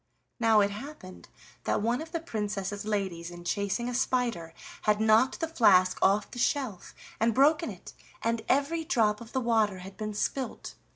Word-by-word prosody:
Now 225 -2 +5
it 200 0 +1
happened 210 -4 -10 0.4
that - - 0
one 235 +4 +1
of 320 0 -8
the 335 - -2
Princess's 210 - -4
ladies 190 -5 -2
in 175 0 -10
chasing 200 +6 -1
a 245 - -3
spider 240 -9 0 0.3
had 210 0 +2
knocked 220 +7 +3
the 325 - 0
flask 185 - +4
off 200 +2 +2
the 245 - -7
shelf 245 -7 -1 0.2
and 225 0 +2
broken 305 +4 +4
it, - - -10 0.3
and 230 0 0
every 285 +5 +1
drop 225 -10 +1
of 235 0 -11
the 260 - 0
water 220 -5 +2
had 195 0 -11
been 215 -1 -4
spilt. 260 +5 -3
220 Hz, 175 wpm, -29 LUFS, 200-260 Hz, 0.4 s, Now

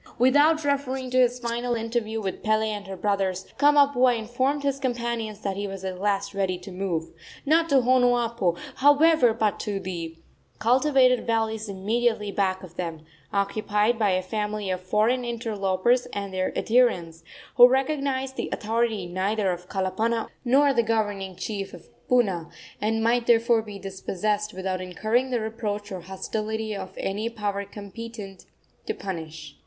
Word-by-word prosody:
Without 290 +6 +4
referring 265 -2 -1
to 255 - +3
his 250 -1 +3
final 240 0 -2
interview 225 -1 -2
with 195 -3 -4
Pele 215 0 +1
and 205 -2 -6
her 190 -1 -6
brothers, 190 -1 -1
Kamapuaa 280 -4 +5
informed 255 +6 -1
his 275 -1 0
companions 235 -4 -3
that 195 -1 -2
he 205 0 -2
was 195 -1 -7
at 185 -1 -4
last 200 0 0
ready 190 -2 0
to 180 +2 -10
move 180 -3 -3 0.3
not 325 +3 +3
to 280 - +3
Honuapo, 240 -7 +2 0.2
however, 290 -1 +5
but 220 -2 0
to 205 -2 -2
the 170 -3 -5 0.4
cultivated 255 +1 +3
valleys 220 -1 0
immediately 210 +2 0
back 190 -2 0
of 175 -2 -12
them, 165 -3 -5 0.3
occupied 210 +2 +1
by 210 -2 +3
a 185 0 +1
family 210 0 -3
of 185 0 -2
foreign 215 +7 +1
interlopers 230 0 0
and 200 -1 -4
their 185 0 -1
adherents, 180 -9 +2 0.3
who 245 0 +11
recognized 265 0 -1
the - - -2
authority 225 -2 -1
neither 190 +3 0
of 180 0 -6
Kalapana 215 +4 -1
nor 275 +3 +4
the 235 - +3
governing 205 -4 -1
chief 195 -1 -5
of 175 - -15 0.2
Puna, 195 -10 +2 0.3
and 225 +1 0
might 235 +1 +2
therefore 230 0 +4
be 210 -2 -9
dispossessed 200 +2 -2
without 185 0 -3
incurring 220 +8 0
the 245 -2 0
reproach 210 -2 -4
or 185 -2 -5
hostility 215 +4 -4
of 190 -1 -7
any 210 +4 -2
power 205 -3 -3
competent 205 0 -9 0.4
to 435 - -1
punish. 160 -5 -7
215 Hz, 155 wpm, -25 LUFS, 195-240 Hz, 0.4 s, who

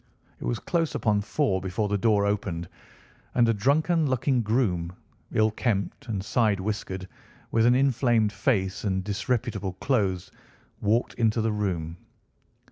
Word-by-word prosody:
It - - -6
was - - 0
close 165 -3 -1
upon 105 -2 +1
four 105 -4 0
before 95 +3 -1
the 105 - 0
door 105 -1 +3
opened, 95 -5 -2 0.7
and 120 -2 +4
a 115 - +3
drunken 150 - +2
looking 130 0 +1
groom, 100 -7 0 0.4
ill 110 0 +3
kempt 105 0 -2
and 100 -4 -3
side 110 -3 +2
whiskered, 95 -2 -4 0.4
with 115 0 +3
an 120 - +5
inflamed 120 -5 +2
face 100 -2 0
and 95 -2 0
disreputable 100 0 -2
clothes, 95 -6 -1 0.5
walked 110 +4 +1
into 115 -1 +2
the 110 0 +1
room. 90 -6 -2
105 Hz, 140 wpm, -26 LUFS, 95-120 Hz, 0.7 s, an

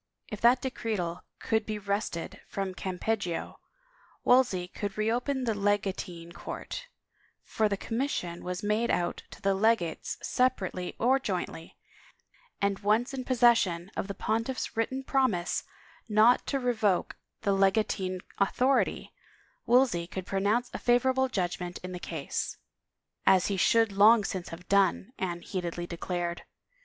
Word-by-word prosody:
If 210 - -6
that 245 +2 +5
decretal 200 -9 -2 0.2
could 220 -1 0
be 215 0 -4
wrested 200 -4 -3
from 195 -1 -3
Campeggio, 185 -1 -3 0.6
Wolsey 245 -8 +4
could 200 +1 -5
reopen 245 +5 0
the 230 -2 +1
legatine 195 -4 -1
court - - -7 0.3
— - - -38
for 215 -1 +3
the 200 - -1
commission 225 -8 -3
was 180 +1 -4
made 210 +3 +1
out 175 0 0
to - - -12
the 195 0 +3
legates 195 -5 +1
separately 190 -8 0
or 260 +3 +3
jointly 180 -7 -4 0.4
— - - -34
and 200 -1 +1
once 215 +5 +1
in 255 -1 -4
possession 225 -8 +3
of - - -2
the 200 - -5
pontiff's 230 +6 -2
written 260 +4 -1
promise 255 -11 +1 0.4
not 220 +3 +5
to 275 - 0
re 250 -1 +1
voke 210 -5 +1 0.3
the 200 - +2
legatine 195 -2 +1 0.2
authority, 255 +7 +1 0.5
Wolsey 240 -9 +3
could 185 0 -6
pronounce 205 +6 0
a - - -4
favorable 260 +2 +3
judgment 180 -4 -2
in 185 - -5
the 180 - -5
case. 160 -5 -4 0.3
" - - -58 0.3
As 185 0 +5
he 200 - 0
should 225 +3 +4
long 210 +3 +6
since 185 -2 -4
have 175 +2 -10
done," 200 +3 +2
Anne 175 -2 -2
heatedly 175 -2 -4
declared. 175 0 -3
200 Hz, 145 wpm, -29 LUFS, 180-235 Hz, 0.6 s, long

